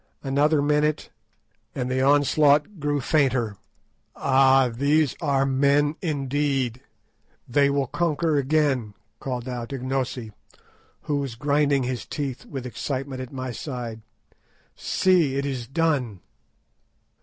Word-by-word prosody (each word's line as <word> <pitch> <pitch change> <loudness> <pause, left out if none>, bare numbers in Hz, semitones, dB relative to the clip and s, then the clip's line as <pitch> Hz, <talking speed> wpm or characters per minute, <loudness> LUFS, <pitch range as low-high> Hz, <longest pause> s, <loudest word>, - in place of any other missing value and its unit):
Another 145 +2 +2
minute 150 +1 +1 0.6
and 125 -1 -2
the 130 0 +1
onslaught 145 +5 +3
grew 145 0 0
fainter. 130 -8 +1 0.6
"Ah, 135 -1 +4
these 145 +4 +2
are 140 -4 +2
men, 140 +2 +2
indeed; 140 -5 -1 0.7
they 140 +3 +3
will 140 -1 +1
conquer 165 +2 0
again," 140 -6 +1 0.2
called 125 -3 -4
out 120 -1 -5
Ignosi, 130 -3 -3 0.7
who 145 - -1
was 135 -5 -3
grinding 145 +1 +1
his 125 -1 -4
teeth 140 -4 -5
with 135 -3 -6
excitement 130 +1 -4
at 130 - -8
my 130 -1 -5
side. 120 -4 -6 0.7
"See, 175 -8 +2
it 140 0 -1
is 130 -4 -4
done!" 135 - 0
135 Hz, 115 wpm, -24 LUFS, 130-145 Hz, 0.7 s, Ah